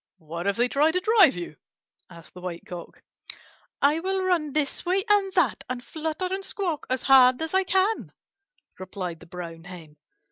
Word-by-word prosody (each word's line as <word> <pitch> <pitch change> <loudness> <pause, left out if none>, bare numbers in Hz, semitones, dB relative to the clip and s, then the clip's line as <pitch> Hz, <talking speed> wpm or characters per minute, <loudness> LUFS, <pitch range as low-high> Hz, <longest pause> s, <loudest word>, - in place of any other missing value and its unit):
"What 170 +3 -6
if 200 - +1
they 240 +1 +3
try 290 +5 +3
to 360 +3 +1
drive 410 - +5
you?" 175 -4 -7 0.5
asked 170 -2 -15
the 180 - -11
White 175 -2 -6
Cock. 175 -1 -10 0.8
"I 295 +3 +4
will 380 +2 -1
run 345 -5 +1
this 290 -1 -1
way 375 +3 0
and 410 -2 +3
that, 320 - +1
and 250 -1 -4
flutter 320 +3 -4
and 390 0 -3
squawk 355 -7 -3
as 260 0 -1
hard 255 -2 +6
as 320 +2 -4
I 380 0 +3
can," 380 +4 0 0.7
replied 185 -3 -6
the - - -15
Brown 165 -1 -8
Hen. 165 -4 -11
280 Hz, 180 wpm, -25 LUFS, -, 0.8 s, hard